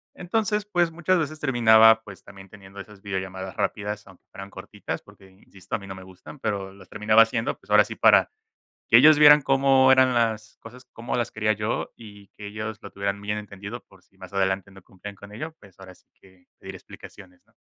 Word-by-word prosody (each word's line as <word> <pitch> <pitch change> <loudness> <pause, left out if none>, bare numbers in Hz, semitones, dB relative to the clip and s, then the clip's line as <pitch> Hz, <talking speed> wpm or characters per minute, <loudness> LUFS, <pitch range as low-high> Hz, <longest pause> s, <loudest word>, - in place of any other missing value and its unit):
Entonces, 210 +3 -2
pues 175 -5 0
muchas 175 +2 0
veces 155 -1 -4
terminaba, 110 -5 +5
pues 100 -3 -14
también 95 -1 -14
teniendo 100 0 -14
esas 105 0 -13
videollamadas 95 -2 -6
rápidas 105 0 -4
aunque 95 -2 -19
fueran 100 0 -10
cortitas - - -8
porque, 95 -1 -19
insisto, 95 0 -8
a - - -8
mí 100 - -12
no 95 - -8
me 95 - -12
gustan, 95 +9 -14
pero 100 -3 -4
los 95 -1 -17
terminaba 110 +1 +4
haciendo, 115 0 -2
pues - - -23
ahora - - +6
sí - - -8
para - - +4 0.6
que - - +7
ellos 155 -1 +6
vieran 150 0 +8
cómo 135 -1 +3
eran 130 -1 +4
las 110 -2 -2
cosas. 125 +3 -14
Cómo 115 +1 -5
las 120 -1 -2
quería 110 0 0
yo 105 +2 -4
y 105 -3 -15
que 105 - -11
ellos 110 +1 -6
lo - - -11
tuvieran 100 0 -4
muy 100 - -13
bien 105 0 -2
entendido 105 +2 -9
por 95 -1 -22
si 95 - -33
más 95 0 -13
adelante 95 0 -1
no 95 -1 -16
cumplían 100 +3 -12
con 100 +1 -14
ello, 155 +9 -8
pues 100 -3 -20
ahora 95 -1 -13
sí - - -28 0.2
que, 95 -2 -23
pedir - - -10
explicaciones, 90 -3 -15
¿no? - - -34
105 Hz, 215 wpm, -24 LUFS, 95-120 Hz, 0.6 s, vieran